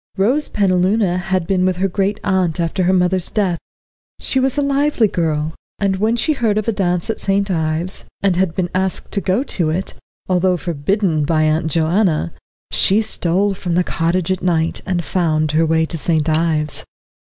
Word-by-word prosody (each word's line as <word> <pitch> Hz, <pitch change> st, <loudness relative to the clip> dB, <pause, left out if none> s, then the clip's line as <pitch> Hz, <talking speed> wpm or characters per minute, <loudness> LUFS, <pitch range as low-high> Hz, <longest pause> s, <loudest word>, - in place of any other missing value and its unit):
Rose 250 Hz, +10 st, +2 dB
Penaluna 185 Hz, -1 st, +1 dB
had 185 Hz, -1 st, -1 dB
been 185 Hz, 0 st, +1 dB
with 185 Hz, 0 st, +1 dB
her 195 Hz, +2 st, +1 dB
great 195 Hz, +2 st, -1 dB
aunt 185 Hz, -4 st, 0 dB
after 170 Hz, +2 st, 0 dB
her 185 Hz, -, +3 dB
mother's 180 Hz, -1 st, +1 dB
death. 185 Hz, -6 st, 0 dB, 0.6 s
She 265 Hz, -, 0 dB
was 265 Hz, +1 st, +1 dB
a 290 Hz, -, +2 dB
lively 280 Hz, -4 st, +2 dB
girl, 160 Hz, -4 st, -1 dB, 0.2 s
and 195 Hz, -1 st, 0 dB
when 220 Hz, +4 st, +1 dB
she 310 Hz, +7 st, +1 dB
heard 225 Hz, -6 st, 0 dB
of 215 Hz, -, -1 dB
a -, -, +3 dB
dance 180 Hz, -4 st, -1 dB
at -, -, -6 dB
St. 195 Hz, 0 st, 0 dB
Ives, 160 Hz, +2 st, -1 dB, 0.2 s
and 195 Hz, -3 st, +3 dB
had 180 Hz, -2 st, 0 dB
been 180 Hz, -2 st, -2 dB
asked 190 Hz, 0 st, -1 dB
to 200 Hz, -, -1 dB
go 195 Hz, +8 st, +1 dB
to 175 Hz, -, -1 dB
it, 180 Hz, +5 st, -2 dB, 0.3 s
although 185 Hz, 0 st, +2 dB
forbidden 170 Hz, +1 st, 0 dB
by 155 Hz, +1 st, +1 dB
Aunt 155 Hz, +2 st, +1 dB
Joanna, 165 Hz, -, +1 dB, 0.4 s
she 210 Hz, +3 st, +3 dB
stole 195 Hz, -1 st, 0 dB
from 180 Hz, -2 st, -3 dB
the 180 Hz, -, +3 dB
cottage 170 Hz, +2 st, -1 dB
at 185 Hz, -, -1 dB
night, 165 Hz, -2 st, 0 dB
and 175 Hz, -2 st, -1 dB
found 155 Hz, -2 st, 0 dB
her 160 Hz, +1 st, +2 dB
way 160 Hz, 0 st, +2 dB
to 165 Hz, 0 st, -5 dB
St. 155 Hz, -1 st, +1 dB
Ives. 155 Hz, -1 st, +1 dB
180 Hz, 185 wpm, -18 LUFS, 165-200 Hz, 0.6 s, her